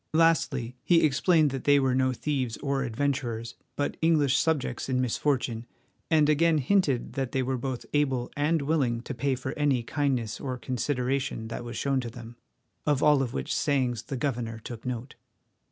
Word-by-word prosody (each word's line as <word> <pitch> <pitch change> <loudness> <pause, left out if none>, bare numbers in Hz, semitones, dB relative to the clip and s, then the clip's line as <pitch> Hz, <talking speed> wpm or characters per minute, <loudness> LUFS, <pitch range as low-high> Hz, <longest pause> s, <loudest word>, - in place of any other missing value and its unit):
Lastly, 150 -7 +2
he 170 -2 +4
explained 155 +1 +3
that 135 -1 -5
they 145 0 +6
were 135 -2 +2
no 130 0 +2
thieves 130 -3 -2
or 140 -2 -1
adventurers, 120 -2 -2 0.2
but 145 - -2
English 150 -5 +3
subjects 155 -4 0
in 130 -1 +1
misfortune, 125 -2 -1 0.4
and 155 -2 +4
again 160 +2 +3
hinted 140 -5 +1
that 135 0 -3
they 130 -1 +1
were 130 +1 -1
both 130 0 -4
able 135 -4 +1
and 150 +1 +1
willing 135 -6 +1
to 135 - -6
pay 135 +1 0
for 130 +1 -4
any 140 -5 +1
kindness 130 -5 -1
or 130 -2 -4
consideration 130 -2 -2
that 120 - -5
was 120 0 -6
shown 140 -1 +1
to 120 -2 -4
them, 115 0 -10 0.5
of 145 -2 +1
all 150 -2 +5
of 125 -3 -3
which 65 - -2
sayings 125 -5 +1
the 130 +3 -5
governor 120 -4 -2
took 115 +2 -8
note. 125 +1 -4
135 Hz, 175 wpm, -27 LUFS, 120-145 Hz, 0.5 s, they